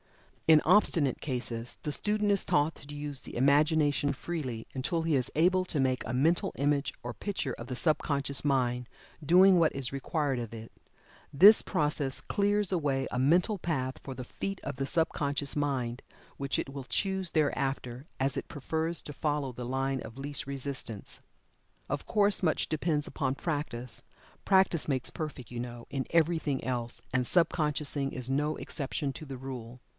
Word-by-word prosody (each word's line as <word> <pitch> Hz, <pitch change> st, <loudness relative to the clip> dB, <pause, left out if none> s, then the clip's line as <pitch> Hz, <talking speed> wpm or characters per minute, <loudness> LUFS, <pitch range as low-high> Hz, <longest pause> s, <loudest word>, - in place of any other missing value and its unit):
In 155 Hz, -1 st, +7 dB
obstinate 165 Hz, -, +3 dB
cases, 120 Hz, -3 st, -3 dB
the 150 Hz, -, -2 dB
student 210 Hz, +3 st, +1 dB
is 200 Hz, -2 st, +3 dB
taught 145 Hz, +2 st, +2 dB
to 145 Hz, +1 st, -11 dB
use 145 Hz, -2 st, -4 dB
the -, -, -8 dB
Imagination 145 Hz, +1 st, +3 dB
freely, 130 Hz, -8 st, -5 dB
until 160 Hz, +5 st, -1 dB
he 165 Hz, -2 st, +2 dB
is 125 Hz, -3 st, 0 dB
able 185 Hz, +4 st, +4 dB
to 155 Hz, -, -3 dB
make 130 Hz, -1 st, +1 dB
a -, -, -3 dB
mental 165 Hz, +9 st, +2 dB
image 145 Hz, 0 st, +1 dB
or 120 Hz, 0 st, -4 dB
picture 185 Hz, -, -3 dB
of 115 Hz, -, -8 dB
the 125 Hz, -, -4 dB
sub 155 Hz, +4 st, +2 dB
conscious 140 Hz, -1 st, -1 dB
mind 125 Hz, -4 st, +1 dB, 0.4 s
doing 185 Hz, +3 st, +7 dB
what 160 Hz, -2 st, +3 dB
is 135 Hz, -1 st, -4 dB
required 140 Hz, -1 st, -1 dB
of 115 Hz, -2 st, -6 dB
it. 115 Hz, 0 st, -9 dB, 0.6 s
This 200 Hz, +10 st, +8 dB
process 150 Hz, -6 st, 0 dB
clears 205 Hz, -1 st, 0 dB
away 140 Hz, -6 st, 0 dB
a 125 Hz, -, -1 dB
mental 175 Hz, -, +3 dB
path 135 Hz, -7 st, -2 dB
for 135 Hz, -, -6 dB
the 125 Hz, -1 st, -7 dB
feet 195 Hz, +9 st, -5 dB
of 140 Hz, -, -5 dB
the 135 Hz, +1 st, -2 dB
sub 165 Hz, +1 st, +2 dB
conscious 140 Hz, -1 st, -1 dB
mind, 135 Hz, -5 st, -1 dB, 0.3 s
which 140 Hz, -1 st, -1 dB
it -, -, -2 dB
will 140 Hz, -1 st, -5 dB
choose 190 Hz, +4 st, -1 dB
thereafter, 135 Hz, -3 st, -1 dB
as 135 Hz, +1 st, +1 dB
it -, -, -4 dB
prefers 160 Hz, +4 st, -2 dB
to 150 Hz, -, -7 dB
follow 145 Hz, -3 st, -1 dB
the 125 Hz, 0 st, -6 dB
line 135 Hz, +1 st, -1 dB
of 110 Hz, +3 st, -9 dB
least 140 Hz, 0 st, -3 dB
resistance. 135 Hz, -6 st, -5 dB, 0.7 s
Of 145 Hz, 0 st, -3 dB
course 205 Hz, -1 st, +3 dB
much 160 Hz, -, +2 dB
depends 155 Hz, -1 st, 0 dB
upon 130 Hz, -, -1 dB
practice 140 Hz, -7 st, -4 dB, 0.4 s
practice 190 Hz, -4 st, +3 dB
makes 130 Hz, -3 st, -1 dB
perfect, 150 Hz, -6 st, -6 dB
you 120 Hz, -, -5 dB
know, 120 Hz, -1 st, -7 dB
in 135 Hz, -2 st, -2 dB
everything 160 Hz, -4 st, +1 dB
else, 120 Hz, -2 st, -2 dB
and 130 Hz, -1 st, +2 dB
sub 170 Hz, +6 st, +3 dB
consciousing 150 Hz, -3 st, 0 dB
is 130 Hz, 0 st, -1 dB
no 150 Hz, +3 st, 0 dB
exception 140 Hz, -1 st, -2 dB
to 155 Hz, -, -8 dB
the 135 Hz, -2 st, -7 dB
rule. 125 Hz, -2 st, -7 dB
140 Hz, 175 wpm, -30 LUFS, 130-160 Hz, 0.7 s, This